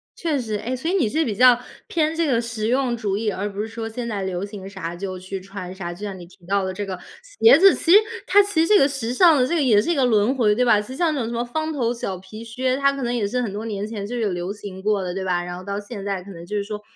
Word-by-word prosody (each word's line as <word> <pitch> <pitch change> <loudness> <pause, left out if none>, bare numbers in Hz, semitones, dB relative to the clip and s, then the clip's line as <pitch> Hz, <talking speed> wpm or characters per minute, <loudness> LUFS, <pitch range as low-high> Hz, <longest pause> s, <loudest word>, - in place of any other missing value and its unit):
确 315 -4 -1
实。 220 -4 -3
诶， 240 +5 -3
所 265 +6 -3
以 - - 0
你 315 - +2
是 315 +7 +1
比 215 - -2
较 250 +2 +6 0.3
偏 315 -1 0
这 335 0 +1
个 245 -5 +2
实 230 -2 -3
用 250 0 +1
主 205 -4 -2
义， 215 0 -1
而 205 +2 -3
不 200 - -8
是 215 - -3
说 225 0 -6
现 235 +2 -5
在 210 -4 -3
流 185 -1 -3
行 200 -2 -9
啥 190 -4 -6
就 185 +1 -5
去 190 +1 -6
穿 185 -1 -8
啥， 175 -2 -6
就 175 - -14
像 195 -2 -5
你 175 - -10
提 175 0 -20
到 200 +2 +1
的 190 0 -3
这 205 +2 -4
个 190 -2 -5 0.2
鞋 - - +5
子， 390 +1 +7
其 335 - 0
实 390 - +10 0.3
它 410 - +6
其 395 -5 +1
实 330 - +2
这 420 - +6
个 275 - +5
时 260 -4 -3
尚 335 +4 +6
的， 250 - +3
这 335 - -1
个 325 - +2
也 225 -7 +4
是 235 - -3
一 - - +1
个 270 -3 +3
轮 220 0 +3
回， 215 -5 +3
对 250 - +2
吧？ 220 -3 +5
其 210 - -11
实 260 - -7
像 325 +1 +1
那 290 - -2
种 225 - -2
什 - - -5
么 235 0 -1
方 310 +6 -3
头 240 -5 0
小 195 -5 -4
皮 190 +5 -10
靴， 255 +3 -1
它 275 0 +3
可 275 -1 -5
能 240 0 -1
也 225 -4 0
是 250 +5 -1
很 230 -5 -3
多 210 +3 -5
年 205 -2 -3
前 210 -2 -5
就 245 - -5
有 220 -4 0
流 180 +2 -3
行 200 -2 -9
过 205 -1 +1
的， 180 -1 -3
对 190 +1 -4
吧？ 175 -1 0
然 175 0 -6
后 185 - -9
到 200 +1 -4
现 205 0 -8
在 195 -2 -2
可 200 - -11
能 170 -2 -10
就 210 +4 -5
是 205 - 0
说， 210 0 -6
220 Hz, 345 characters per minute, -22 LUFS, 195-255 Hz, 0.3 s, 实